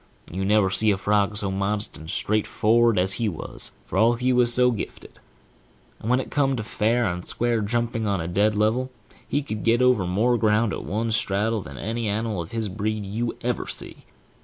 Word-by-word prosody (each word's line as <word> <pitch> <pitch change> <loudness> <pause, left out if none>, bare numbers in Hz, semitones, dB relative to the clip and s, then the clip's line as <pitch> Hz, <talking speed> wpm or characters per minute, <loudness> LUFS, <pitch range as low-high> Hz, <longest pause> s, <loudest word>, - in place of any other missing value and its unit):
You 95 +3 -3
never 100 -1 +3
see 110 +3 +2
a 100 - +2
frog 105 +1 +1
so 100 -2 -1
modest 100 +2 -2
and 80 - -10
straightfor'ard 110 +4 +2
as 95 +1 +2
he 110 - +2
was, 80 - -5
for - - -2
all 115 +2 +5
he 125 +2 +1
was 125 -1 +3
so 125 +1 +4
gifted. 110 - -7 0.8
And 110 - -5
when 125 +1 +4
it - - -5
came 135 -2 +2
to 115 - -3
fair 110 +3 +1
and 90 -2 -2
square 120 +2 0
jumping 115 +1 -1
on 100 -2 0
a 80 - -3
dead 100 +5 +2
level, 110 +5 +1 0.4
he 145 +1 0
could 110 -6 -5
get 115 +1 +3
over 125 -7 +3
more 115 +7 +2
ground 110 0 +2
at - - -5
one 110 +3 -1
straddle 110 +1 0
than 70 -6 -10
any 115 - -3
animal 105 -2 -1
of 85 - -8
his 115 -2 -2
breed 105 +1 -3
you 115 +4 -3
ever - - -1
see. - - -6
110 Hz, 205 wpm, -24 LUFS, 100-115 Hz, 0.8 s, all